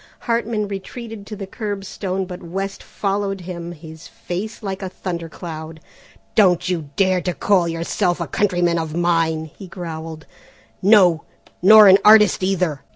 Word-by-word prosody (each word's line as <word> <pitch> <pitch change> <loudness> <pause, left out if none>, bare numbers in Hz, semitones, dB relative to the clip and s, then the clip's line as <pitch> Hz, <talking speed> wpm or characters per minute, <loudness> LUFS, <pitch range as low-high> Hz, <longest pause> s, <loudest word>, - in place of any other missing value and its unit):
Hartman 230 -3 -1
retreated 205 +2 -8
to 215 - -6
the 200 -1 -6
curbstone, 195 -2 -4
but 180 -1 -9
West 195 +3 -5
followed 195 -1 -3
him, 175 -1 -7
his 160 -1 -12
face 210 +6 -6
like 195 -1 -4
a 190 - -4
thunder 170 -3 -5
cloud. 160 -1 -8 0.5
"Don't 185 -5 +3
you 165 -5 -2
dare 185 -2 +2
to 180 -1 -3
call 190 -4 +2
yourself 170 +2 -1
a 170 - -2
countryman 175 -3 +1
of 160 -1 -4
mine," 165 -2 0
he 195 - -10
growled, 160 -3 -7 0.6
"no, 185 -5 +5 0.4
nor 210 +3 +9
an 190 +1 +8
artist 210 -2 +6
either! 180 -6 0
185 Hz, 150 wpm, -20 LUFS, 170-200 Hz, 0.6 s, nor